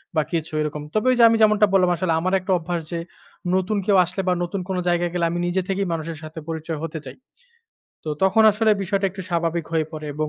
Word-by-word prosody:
বা 155 - +4
কিছু 160 -2 -3
এরকম। 150 0 -3
তবে 215 +3 0
ওই - - +3
যে, 235 - +7
আমি 225 - +3
যেমনটা 215 -1 +5
বললাম 185 -2 +4
আসলে 170 -1 0
আমার 185 +3 -1
একটা 185 +1 -4
অভ্যাস 170 0 -3
যে, 170 - -2 0.6
নতুন 190 +3 0
কেউ 200 -1 +4
আসলে 180 +3 -4
বা 180 - +4
নতুন 180 +2 -3
কোন 190 - -1
জায়গায় 175 0 +1
গেলে 175 -1 +1
আমি 175 - -2
নিজে 180 +2 0
থেকেই 195 0 0
মানুষের 165 0 -4
সাথে 155 +1 -8
পরিচয় 160 -1 -4
হতে 160 0 -6
চাই। - - -9 0.9
তো - - -5
তখন 190 +3 +4
আসলে 215 +1 +2
বিষয়টা 195 +1 0
একটু 190 +1 -8
স্বাভাবিক 170 -1 0
হয়ে 160 -2 +1
পড়ে 155 -1 -6
এবং 155 +1 -2
175 Hz, 230 wpm, -22 LUFS, 160-195 Hz, 0.9 s, যে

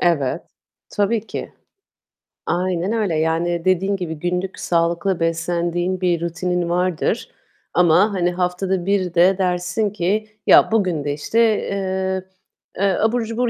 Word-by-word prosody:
Evet, 150 -7 +1 0.5
tabii 210 +2 0
ki. - - -6 0.9
Aynen 180 +2 -1
öyle. 210 -8 0
Yani 165 +2 0
dediğin 190 +2 +2
gibi, 175 -4 -4
günlük 180 +2 -3
sağlıklı 170 +2 0
beslendiğin 175 +2 -1
bir 175 -2 +1
rutinin 175 0 -2
vardır 180 -1 -1 0.4
ama, 180 +4 +4
hani, 175 -1 +1
haftada 180 +1 -1
bir 190 -3 0
de 180 +2 +4
dersin 180 +3 0
ki 210 +2 -1 0.2
"Ya, - - +6
bugün 185 -9 +1
de, 145 -1 -1
işte, 155 +10 -1 0.2
eee, 190 -1 -2 0.5
eee, 195 0 +2
abur 230 +2 +2
cubur 230 +2 -1
180 Hz, 130 wpm, -20 LUFS, 170-195 Hz, 0.9 s, Ya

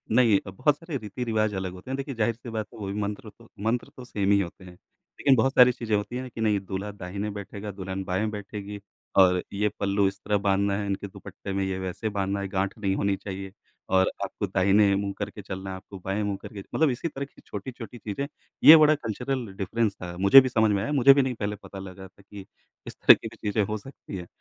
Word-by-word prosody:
नहीं, 115 -5 +5
बहुत 145 +10 +1
सारे 165 -3 -5
रीति-रिवाज़ 110 -1 -2
अलग 95 -1 -3
होते 95 +8 -9
हैं। - - 0
देखिए, 135 -1 -5
ज़ाहिर-सी 115 +2 -1
बात 110 -1 -3
है, - - -12
वो 100 - -5
भी 100 - -3
मंत्र 105 +2 -4
तो 115 -1 -18 0.2
मंत्र 115 +2 0
तो 125 - -9
सेम 100 -5 0
ही 100 - +5
होते 95 0 -5
हैं। 90 - -11 0.5
लेकिन 135 - +5
बहुत 135 +3 +2
सारी 125 0 +8
चीज़ें 115 -3 -2
होती 105 +4 -2
हैं 130 0 -5
कि 115 - -7
नहीं, 105 -2 +2
दूल्हा 95 +1 -5
दाहिने 100 +1 -5
बैठेगा, 100 +1 -6
दुल्हन 95 0 -5
बाएँ 95 +4 -1
बैठेगी, 105 0 -7 0.4
और 90 -1 +6
ये 105 +1 +1
पल्लू 100 0 +2
इस 95 +1 -4
तरह 105 - +2
बाँधना 100 0 +1
है, 105 - -2
इनके 100 0 -3
दुपट्टे 95 0 -8
में 95 - 0
ये 95 -1 -2
वैसे 95 +4 -3
बाँधना 100 -1 -1
है, 100 - -3
गाँठ 95 +2 -2
नहीं 100 -2 0
होनी 100 0 +1
चाहिए, 95 -1 -7 0.4
और 95 0 +3
आपको 100 +1 -3
दाहिने 100 +2 +4
मुँह 100 0 -2
करके 105 0 -5
चलना 95 0 -6
है, 95 - -4
आपको 95 +1 -11
बाएँ 95 +2 -1
मुँह 100 -1 -2
करके, 105 - -9 0.2
मतलब 160 -2 +4
इसी 130 +6 -2
तरह 140 -3 -5
की 140 - -20
छोटी-छोटी 120 +3 -7
चीज़ें। 115 +6 -4 0.4
ये 160 - +12
बड़ा 155 0 +6
कल्चरल 125 0 -3
डिफ़रेंस 110 +2 0
था। 90 -1 -6
मुझे 100 +8 +9
भी 130 - -1
समझ 110 -3 +3
में 100 -1 +1
आया। 115 - -2
मुझे 135 -1 +7
भी 140 - +4
नहीं 130 -1 -1
पहले 105 -1 -3
पता 100 -1 -11
लगा 95 0 -9
था 95 - -22
कि 100 0 -11 0.4
इस - - -7
तरह - - +8
की - - -8
भी - - -11
चीज़ें 105 0 0
हो 105 +1 -2
सकती 105 -3 -9
हैं। 90 -1 -8
105 Hz, 235 wpm, -26 LUFS, 95-115 Hz, 0.5 s, ये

